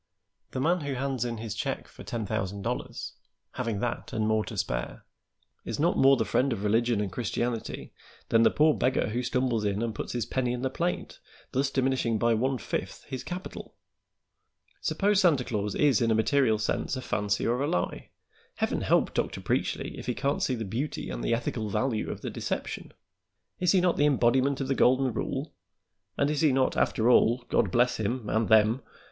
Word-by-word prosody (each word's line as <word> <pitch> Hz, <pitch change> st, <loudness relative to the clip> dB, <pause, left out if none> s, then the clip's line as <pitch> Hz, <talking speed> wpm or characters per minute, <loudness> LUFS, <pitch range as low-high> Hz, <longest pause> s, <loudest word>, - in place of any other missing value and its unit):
The -, -, -4 dB
man 170 Hz, +6 st, +2 dB
who 140 Hz, -2 st, -3 dB
hands 130 Hz, -2 st, -1 dB
in 120 Hz, -1 st, -3 dB
his 110 Hz, -1 st, -5 dB
check -, -, -3 dB
for -, -, -13 dB
ten 115 Hz, -2 st, -4 dB
thousand 100 Hz, -1 st, -3 dB
dollars, -, -, -4 dB, 0.4 s
having 115 Hz, -5 st, -3 dB
that 120 Hz, -1 st, -3 dB
and 110 Hz, 0 st, 0 dB
more 110 Hz, 0 st, +2 dB
to 110 Hz, -, -7 dB
spare, 60 Hz, -11 st, -3 dB, 0.6 s
is -, -, -4 dB
not -, -, +3 dB
more 135 Hz, 0 st, +6 dB
the 110 Hz, -, 0 dB
friend 135 Hz, +1 st, +1 dB
of 105 Hz, -4 st, -3 dB
religion 115 Hz, +2 st, +2 dB
and 100 Hz, -3 st, -2 dB
Christianity 120 Hz, +1 st, -3 dB, 0.4 s
than 115 Hz, -, +4 dB
the 115 Hz, -, +6 dB
poor 155 Hz, +1 st, +4 dB
beggar 130 Hz, -5 st, +1 dB
who 120 Hz, +3 st, -1 dB
stumbles 125 Hz, -3 st, 0 dB
in 105 Hz, +1 st, 0 dB
and 115 Hz, -1 st, -2 dB
puts -, -, -5 dB
his 120 Hz, -3 st, -1 dB
penny 125 Hz, 0 st, -1 dB
in 125 Hz, +1 st, -4 dB
the 130 Hz, -, 0 dB
plate, 175 Hz, +5 st, -3 dB, 0.3 s
thus 135 Hz, +1 st, +1 dB
diminishing 130 Hz, -4 st, +1 dB
by 115 Hz, +1 st, +2 dB
one 130 Hz, +4 st, +1 dB
fifth -, -, -4 dB
his 130 Hz, -, -4 dB
capital. 180 Hz, +2 st, -7 dB, 1.1 s
Suppose 205 Hz, 0 st, +2 dB
Santa 155 Hz, -9 st, +4 dB
Claus 105 Hz, -3 st, -2 dB
is 140 Hz, -7 st, +3 dB
in 115 Hz, -, +2 dB
a 110 Hz, -, +3 dB
material 110 Hz, 0 st, +3 dB
sense 105 Hz, +5 st, -1 dB
a 130 Hz, -, -4 dB
fancy 105 Hz, -3 st, -1 dB
or 120 Hz, +3 st, +1 dB
a 145 Hz, -, +1 dB
lie; 90 Hz, -, -2 dB, 0.5 s
Heaven -, -, -1 dB
help -, -, +2 dB
Dr. -, -, -1 dB
Preachly -, -, -2 dB
if -, -, -8 dB
he 125 Hz, -, -1 dB
can't 140 Hz, 0 st, -1 dB
see 130 Hz, -, +1 dB
the 115 Hz, -2 st, -4 dB
beauty 120 Hz, +10 st, -3 dB
and -, -, -5 dB
the 115 Hz, -, +2 dB
ethical 115 Hz, -2 st, -3 dB
value 115 Hz, +1 st, -1 dB
of -, -, -5 dB
the -, -, -4 dB
deception. -, -, -4 dB, 0.7 s
Is 180 Hz, 0 st, +3 dB
he 185 Hz, -, +4 dB
not 180 Hz, -1 st, +2 dB
the 145 Hz, -, +4 dB
embodiment 135 Hz, 0 st, +2 dB
of 135 Hz, -, -2 dB
the 135 Hz, -, +1 dB
golden 130 Hz, -1 st, +3 dB
rule, -, -, -3 dB, 0.6 s
and 140 Hz, +1 st, +2 dB
is 150 Hz, -, -1 dB
he 155 Hz, -3 st, +5 dB
not, 130 Hz, 0 st, +2 dB
after 110 Hz, -, +1 dB
all 120 Hz, 0 st, +4 dB
God -, -, +2 dB
bless 125 Hz, 0 st, +2 dB
him 110 Hz, +2 st, -2 dB
and 110 Hz, +1 st, +1 dB
them! 110 Hz, +3 st, +5 dB
120 Hz, 200 wpm, -28 LUFS, 110-135 Hz, 1.1 s, more